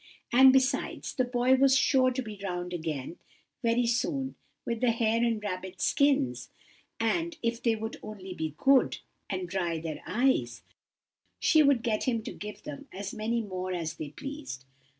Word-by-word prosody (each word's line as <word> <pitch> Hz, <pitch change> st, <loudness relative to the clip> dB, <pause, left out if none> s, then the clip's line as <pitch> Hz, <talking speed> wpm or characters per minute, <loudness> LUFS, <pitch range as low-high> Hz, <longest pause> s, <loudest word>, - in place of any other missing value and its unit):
And, 265 Hz, +2 st, +9 dB
besides, 260 Hz, 0 st, +1 dB
the 255 Hz, -, +1 dB
boy 245 Hz, +1 st, +2 dB
was 270 Hz, 0 st, +5 dB
sure 260 Hz, -1 st, +4 dB
to 255 Hz, +1 st, -2 dB
be 210 Hz, -3 st, -9 dB
round 180 Hz, -2 st, -3 dB
again 160 Hz, -2 st, -4 dB, 0.4 s
very 235 Hz, +1 st, +2 dB
soon 265 Hz, +3 st, 0 dB, 0.3 s
with 235 Hz, -1 st, -2 dB
the 250 Hz, -, +4 dB
hare 230 Hz, 0 st, +2 dB
and 230 Hz, -2 st, +1 dB
rabbit 185 Hz, -2 st, -5 dB
skins; 130 Hz, -, +2 dB, 0.5 s
and 330 Hz, +9 st, 0 dB
if 230 Hz, 0 st, -1 dB
they 230 Hz, -2 st, +2 dB
would 220 Hz, +1 st, -5 dB
only 195 Hz, -3 st, -8 dB
be 160 Hz, -3 st, -4 dB
good, 270 Hz, -2 st, +4 dB, 0.3 s
and 185 Hz, -2 st, -3 dB
dry 175 Hz, -2 st, -1 dB
their 160 Hz, -1 st, -5 dB
eyes, 260 Hz, +3 st, +1 dB, 0.8 s
she 315 Hz, -, +5 dB
would 280 Hz, -5 st, +4 dB
get 220 Hz, -2 st, 0 dB
him 230 Hz, -4 st, 0 dB
to -, -, -6 dB
give 210 Hz, 0 st, -8 dB
them 285 Hz, -1 st, -8 dB
as 195 Hz, +1 st, -6 dB
many 230 Hz, +2 st, -1 dB
more 185 Hz, -2 st, -4 dB
as 165 Hz, -3 st, -3 dB
they 150 Hz, -, -5 dB
pleased. 270 Hz, -, -7 dB
225 Hz, 170 wpm, -29 LUFS, 185-260 Hz, 0.8 s, And